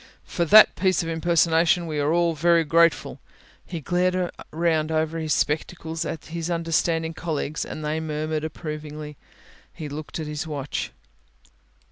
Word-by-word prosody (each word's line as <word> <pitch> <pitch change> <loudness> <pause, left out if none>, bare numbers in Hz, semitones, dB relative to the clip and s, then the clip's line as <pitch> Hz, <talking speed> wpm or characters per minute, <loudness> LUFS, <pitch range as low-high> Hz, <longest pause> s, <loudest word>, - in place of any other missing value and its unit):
For 170 - -2
that 215 +6 +8
piece 185 -2 +2
of 165 - -4
impersonation 170 +1 +2
we 155 -2 -3
are 145 +1 +1
all 170 0 +2
very 170 +2 +3
grateful;" 165 +1 +2 0.5
he 170 - -5
glared 180 +3 0 0.2
round 160 -1 0
over 160 +1 0
his 155 -1 -3
spectacles 160 +2 -1
at 160 - -5
his 165 +1 -4
understanding 165 -1 0
colleagues 155 -3 -3
and 155 - -6
they 155 +1 -1
murmured 155 0 -3
approvingly. 150 -1 -6 0.6
He 155 -2 -7
looked 150 +3 -6
at 160 - -3
his 150 +1 -4
watch. 145 -3 -4
160 Hz, 145 wpm, -24 LUFS, 155-170 Hz, 0.6 s, that